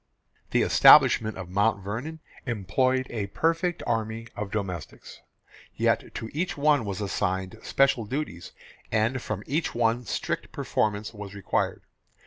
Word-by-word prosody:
The - - +2
establishment 110 -2 +6
of 95 -2 -6
Mount 100 +2 +1
Vernon 130 +11 -5 0.3
employed 130 +4 +1
a 105 -4 -3
perfect 165 - 0
army 110 +1 -2
of 105 -1 -4
domestics; 95 -6 -6 0.5
yet - - 0
to 110 - -5
each 170 +3 -2
one 145 -4 +3
was 100 -1 -4
assigned 95 +1 -2
special 135 -4 +2
duties, 115 - -5 0.4
and 115 +4 +1
from 105 -3 -4
each 155 0 -1
one 120 +1 +1
strict - - -3
performance 105 +1 -1
was 105 -1 -8
required. 100 - -1
110 Hz, 130 wpm, -26 LUFS, 100-130 Hz, 0.5 s, establishment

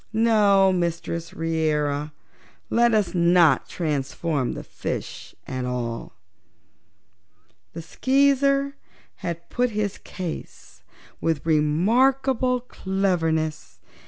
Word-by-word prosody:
No, 205 -4 +4
Mistress 170 -1 -2
Reera, 150 -2 -1 0.6
let 235 -1 +4
us 210 -3 +1
not 170 -2 +4
transform 145 -3 -2
the - - -7
fishes - - -6
at 130 -1 -4
all." 120 -5 -4 1.6
The 165 - -7
Skeezer 275 - +2 0.4
had 170 -1 -5
put 245 0 +1
his 210 -2 -3
case 180 -4 -8 0.4
with 160 -3 -1
remarkable 245 - +2
cleverness. 165 - -1
170 Hz, 85 wpm, -24 LUFS, 155-225 Hz, 1.6 s, No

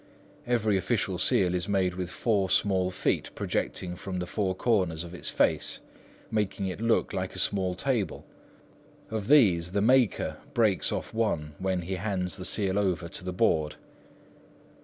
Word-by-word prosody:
Every 110 -4 +2
official 95 - -1
seal 90 -2 +3
is 90 +1 -2
made 95 -3 +1
with 90 -1 -4
four 100 -2 0
small 95 -2 +2
feet 90 - -1
projecting 90 -1 -2
from 95 +1 -5
the 90 - -2
four 95 0 -1
corners 90 -7 +1
of 85 0 -9
its 90 - -4
face, - - +1 0.5
making 105 -2 -1
it 95 +2 -4
look 115 0 +1
like - - -3
a - - -7
small 95 -3 +1
table. 110 - -1 0.9
Of 110 -2 -3
these, 95 - +4
the 100 - +1
maker 125 -1 +3 0.2
breaks 110 -6 +2
off - - -4
one 85 -10 -1
when 95 -2 -1
he 95 +2 -3
hands 95 -1 -2
the 90 - -5
seal 100 -1 +1
over 90 -4 0
to - - -5
the 90 - -3
Board. 80 -6 +1
95 Hz, 160 wpm, -28 LUFS, 90-105 Hz, 0.9 s, these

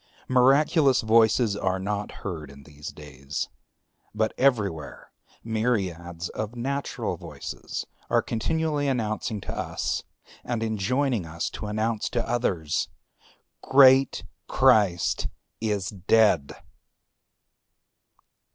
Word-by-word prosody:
Miraculous 135 +2 +4
voices 110 -1 +4
are 95 -2 0
not 100 +2 -3
heard 80 -7 -5
in 70 0 -13
these 75 +1 -11
days; 75 -1 -6 0.7
but 110 0 +1
everywhere 105 - 0 0.3
myriads 95 -7 -2
of 110 +2 -5
natural 135 +4 -3
voices - - -6 0.2
are - - +3
continually 150 +5 -1
announcing 110 -3 -1
to - - -6
us, - - -2 0.4
and 120 -2 -2
enjoining 115 - 0
us 80 +1 -3
to 105 - -6
announce 110 +1 -1
to 120 -1 -2
others, 95 -10 0 0.7
Great 135 -1 +5 0.2
Christ 105 -9 +3 0.3
is 105 -3 -1
dead! 100 -5 +3
110 Hz, 95 wpm, -26 LUFS, 95-125 Hz, 0.7 s, Great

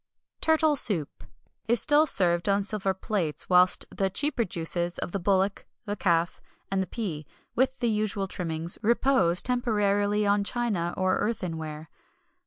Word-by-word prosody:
Turtle 315 -1 +2
Soup 190 - +2 0.4
is 235 0 +3
still 295 +5 +4
served 175 - +2
on 200 0 +2
silver 200 -1 -1
plates, 190 -5 -3
whilst 180 0 +4
the 195 -1 0
cheaper 270 +4 0
juices 175 -1 -3
of - - -4
the 200 - -3
bullock, 195 +1 0 0.2
the 205 -1 -3
calf, 170 -3 0 0.3
and 195 -1 0
the 190 - -3
pea, 165 -11 -5 0.3
"with 260 +1 +1
the 240 - -1
usual 210 -2 -2
trimmings," 165 -2 -2
repose 225 -6 +3
temporarily 210 -4 +1
on 205 0 +2
china 200 -7 -2
or 185 0 +1
earthenware. 160 -8 -4
195 Hz, 145 wpm, -26 LUFS, 175-225 Hz, 0.4 s, still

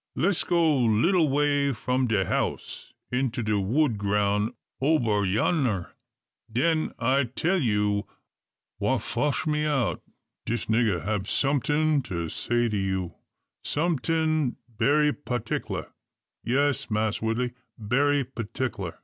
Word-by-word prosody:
Les' 190 0 +2
go 165 -4 +3
little 145 - +3
way 145 0 +2
from 125 +1 0
de 105 -5 +1
house, - - -3 0.2
into 125 -1 -1
de 105 -1 +1
wood 115 +3 +1
groun' 105 +2 +1 0.3
ober 120 -9 +2
yonner; 105 - 0 0.6
den 155 +7 +1
I 130 +3 +2
tell 170 +10 0
you 105 - +1 0.7
wha - - +1
fotch 145 -2 -1
me 150 -1 0
out. 135 -6 0 0.4
Dis 120 +1 -2
nigger 110 -6 +1
hab 105 -2 -1
someting 145 +2 +1 0.3
say 120 +6 0
to 105 -2 -1
you, 95 -3 -2 0.5
someting 155 -2 0
berry 145 +6 +2
patickler. 125 -5 -4 0.5
Yes, 140 +2 +1
Mass 110 -1 0
Woodley, 120 +2 -1 0.2
berry 140 +6 +2
patickler. 115 -6 -4
125 Hz, 115 wpm, -26 LUFS, 105-145 Hz, 0.7 s, go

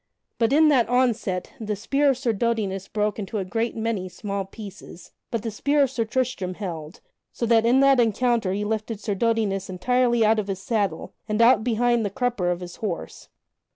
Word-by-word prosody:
But 230 0 +2
in 305 +2 +5
that 255 -6 +3
onset 235 -7 0
the 215 -2 -3
spear 275 +8 +1
of 265 - +2
Sir 250 -3 0
Dodinas 200 -3 -1
broke 210 -1 -1
into 210 +1 -4
a 195 - -2
great 225 +5 -2
many 220 -5 -2
small 200 +1 -4
pieces, 200 -3 -11 0.2
but 230 -3 -3
the 225 - -3
spear 285 +7 +2
of 265 - 0
Sir 235 -4 -1
Tristram 225 -6 -2
held, 170 -5 -7 0.3
so 235 - -3
that 230 0 +4
in 255 +3 +4
the 275 0 +6
encounter 230 -2 +1
he 205 +2 -2
lifted 215 0 -3
Sir 205 0 -2
Dodinas 200 -3 0
entirely 240 +5 +2
out 220 +1 +3
of 205 - -3
his 195 -1 -2
saddle, 200 -5 -2 0.2
and 215 +1 0
out 230 -2 +5
behind 240 0 +2
the 205 - -1
crupper 225 -4 -1
of 175 0 -3
his 175 -1 -8
horse. 200 -6 -5
220 Hz, 195 wpm, -24 LUFS, 195-240 Hz, 0.3 s, the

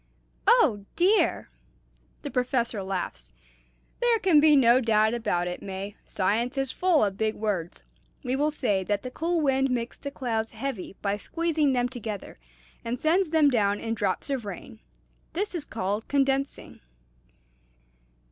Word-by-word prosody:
"Oh 205 -2 +4
dear!" 390 +5 +2 0.7
The 285 - -5
Professor 245 -4 0
laughs. 190 -2 -4 0.7
"There 480 -1 +4
can 365 -7 +4
be 300 0 +6
no 250 -2 +6
doubt 220 -1 +3
about 180 -7 -1
it, 180 - -5
May, 195 +1 -6
science 225 +7 0
is 270 -1 -1
full 355 -10 +3
of 195 -1 -4
big 220 0 0
words. 195 -6 -3 0.4
We 255 0 -1
will 295 +3 +2
say 210 -10 0
that 205 0 -1
the 255 - -6
cool 335 +4 -1
wind 270 -2 +2
makes 240 -1 -3
the 280 - -5
clouds 230 -5 -3
heavy 225 -5 -5
by 200 0 0
squeezing 315 +2 0
them 245 -1 +1
together, 225 - -7 0.4
and 235 +2 -3
sends 340 +3 +2
them 310 -2 +4
down 205 -4 +2
in 225 0 -3
drops 205 +5 -2
of 265 -4 -1
rain. 200 -4 -8 0.5
This 400 +5 -2
is 330 -5 -3
called 205 -1 -3
condensing." 275 0 -1
245 Hz, 150 wpm, -26 LUFS, 205-285 Hz, 0.7 s, be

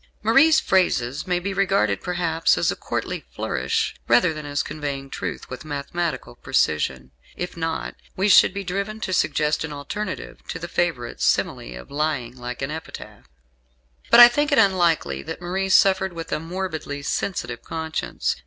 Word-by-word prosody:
Marie's 275 +9 +6
phrases 150 -6 +1
may 180 -1 +1
be 195 +3 -3
regarded, 195 0 +1
perhaps, 170 -2 +1
as - - +2
a - - -4
courtly - - -4
flourish, 450 -1 -1
rather 180 -9 +4
than 155 -1 -7
as 145 0 -1
conveying 140 -3 -5
truth - - -5
with 125 +2 -8
mathematical 155 0 -3
precision. 75 - 0 0.3
If 180 - -4
not, 165 -1 -3 0.2
we 190 +2 +1
should 200 - +7
be 200 +1 -5
driven 200 +4 -3
to 185 - -2
suggest 150 -3 +1
an 160 - -5
alternative 185 +8 -5
to - - -4
the 175 - -6
favourite 165 -10 -2
simile - - 0
of 60 - -13
lying 140 -5 -2
like 125 +1 -6
an 135 - -2
epitaph. 160 - -9 0.8
But 235 - +8
I 240 - +13
think 290 +4 0
it 285 - +3
unlikely 170 - +2
that - - -7
Marie 190 +2 -2
suffered 190 -1 +4
with 165 -1 -7
a - - 0
morbidly 160 -4 -5
sensitive 120 -8 -3
conscience. 160 +2 -3
165 Hz, 160 wpm, -23 LUFS, 140-190 Hz, 0.8 s, I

